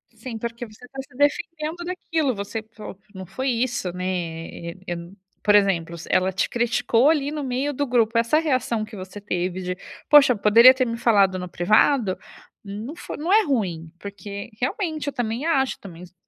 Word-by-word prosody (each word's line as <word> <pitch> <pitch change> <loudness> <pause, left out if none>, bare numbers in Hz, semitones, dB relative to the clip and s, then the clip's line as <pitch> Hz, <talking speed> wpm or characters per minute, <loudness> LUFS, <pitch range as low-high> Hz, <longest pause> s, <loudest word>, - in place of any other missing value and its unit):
Sim, 225 +1 -7
porque 235 +1 -5
você 220 +3 -15
tá 270 - -10
se 255 - -17
defendendo 310 +3 -1
daquilo, 330 -6 -1
você 205 +1 -5
fa 210 -3 -9 0.2
"Não 190 -1 -8
foi 260 +9 -3
isso, 235 -6 -1
né, 180 +1 -5
eh 170 -2 -4
eh, - - -14
eu 175 - -2
n" 170 +3 -11 0.3
por 205 -1 +5
exemplo, 170 -5 +2
se 165 - -10
ela 185 +1 +3
te 185 - 0
criticou, 235 +2 +2
ali, 295 -2 +1
no 305 - -4
meio 265 +2 -1
do 285 +1 -2
grupo, 230 -2 +2
essa 230 +6 +3
reação 255 -7 0
que 215 0 -12
você 190 +2 -8
teve 185 -2 -2
de: 180 0 -4 0.3
"Poxa, 280 -4 +7
poderia 225 +5 +7
ter 255 -1 0
me 230 -1 -3
falado 200 -5 +3
no 180 - -5
privado", 210 +4 +3 0.5
não 215 +9 -7
fo - - -7
não 330 +5 -2
é 435 +1 +6
ruim, 180 - -2
porque, 200 0 -8
realmente, 315 - -2
eu 285 - -2
também 245 +2 -2
acho, 270 -6 +1
também 175 -3 -11
s 180 - -14
230 Hz, 195 wpm, -23 LUFS, 190-270 Hz, 0.5 s, Poxa